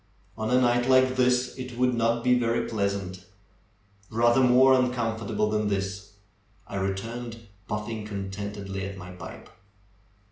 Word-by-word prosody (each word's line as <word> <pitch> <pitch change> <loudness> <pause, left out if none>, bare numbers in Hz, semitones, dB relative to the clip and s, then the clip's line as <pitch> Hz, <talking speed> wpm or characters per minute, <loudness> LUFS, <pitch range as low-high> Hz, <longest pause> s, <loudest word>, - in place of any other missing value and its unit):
On 110 0 -3
a 125 +1 +4
night 120 0 +2
like 130 0 +5
this 125 0 +2
it 125 -1 -7
would 125 0 +2
not 115 0 +1
be 125 - +4
very 120 -1 +1
pleasant; 100 -4 -2 0.9
rather 120 +3 +3
more 130 +1 +6
uncomfortable 115 -4 0
than 105 -1 0
this," 100 -1 -3 0.5
I 100 - -5
returned, 115 +5 -4 0.3
puf 105 0 -2
fing 110 -1 -5
contentedly 100 -1 -5
at 100 0 -8
my 90 -1 -9
pipe. 90 - -10
115 Hz, 140 wpm, -26 LUFS, 100-125 Hz, 0.9 s, more